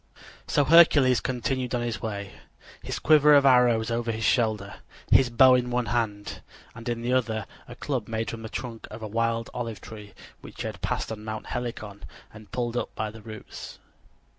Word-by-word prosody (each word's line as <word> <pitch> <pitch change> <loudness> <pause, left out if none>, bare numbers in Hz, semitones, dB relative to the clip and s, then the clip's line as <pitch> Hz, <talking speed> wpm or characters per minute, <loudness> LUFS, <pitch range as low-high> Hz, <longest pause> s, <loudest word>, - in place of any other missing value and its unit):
So 145 - +2
Hercules 145 -6 +6
continued 125 0 -2
on 120 - -1
his 120 -1 -3
way, 100 -3 -5 0.5
his - - -4
quiver 150 -1 +6
of 140 -1 +5
arrows 120 -4 +4
over 115 0 -1
his 110 0 -4
shoulder, 110 -5 0 0.3
his 130 - +5
bow 130 +2 +6
in 125 -1 +2
one 125 0 0
hand, 105 -3 -3 0.3
and 115 +1 -7
in 115 -1 -3
the 125 +1 0
other 110 -4 0 0.2
a 120 - -10
club 125 -3 -3
made 110 0 -3
from 115 - -7
the 110 - -7
trunk 120 -2 -6
of 110 +1 -9
a - - -3
wild 115 +1 -1
olive 115 -4 -5
tree 105 -3 -11 0.2
which - - -10
he - - -4
had - - -6
passed - - -2
on 105 -1 -6
Mount 110 0 -6
Helicon 110 -4 -6 0.3
and 110 -1 -14
pulled 120 -1 -2
up 120 - -3
by 110 -1 -3
the 110 0 -12
roots. 110 0 -10
115 Hz, 190 wpm, -26 LUFS, 110-125 Hz, 0.5 s, Hercules